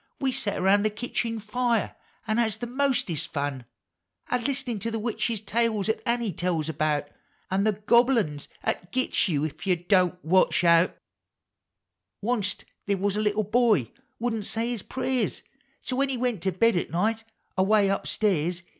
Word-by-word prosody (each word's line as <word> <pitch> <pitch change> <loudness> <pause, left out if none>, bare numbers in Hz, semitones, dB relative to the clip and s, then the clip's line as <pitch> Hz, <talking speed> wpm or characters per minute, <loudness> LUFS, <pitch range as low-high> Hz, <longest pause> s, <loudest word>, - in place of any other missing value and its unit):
We 270 -1 +1
set 205 -5 -2
around 195 +2 +4
the 215 - +2
kitchen 230 +1 -3
fire 230 +1 0 0.3
an' 215 0 0
has 220 -3 +1
the 240 - -4
mostest 240 - 0
fun 140 -4 -3 0.7
A 250 - +2
Iist'nin' 250 -3 -2
to 230 - -1
the 225 - -2
witch 225 +2 -1 0.2
tales 220 -2 +1
'at 220 - 0
Annie 235 -4 0
tells 165 -2 -1
about. 150 -1 0 0.4
An' 195 +2 +2
the 215 - +3
(lobble 240 +2 +5
uns 150 -9 -2 0.2
'at 180 - -2
gits 255 -3 +1
you 155 -4 0
Ef 155 +5 -6
you 185 - +4
Don't 180 0 +2
Watch 185 +2 +3
Out! 170 +1 +4 1.3
Onc't 210 -4 -1 0.2
they 200 - +2
was 195 +1 0
a 210 - 0
little 210 0 +1
boy 215 - +2 0.3
wouldn't 225 -3 -2
say 230 +1 -1
his 235 -4 -3
prayers, 260 +2 -2 0.2
— - - -41
So 255 - -3
when 275 0 +2
he 265 - -1
went 240 -6 -1
to 190 - 0
bed 230 +5 +3
at - - -1
night, 220 +6 0 0.3
away 200 +2 +4
up 195 0 -1
stairs. 175 -4 0
210 Hz, 175 wpm, -26 LUFS, 180-235 Hz, 1.3 s, lobble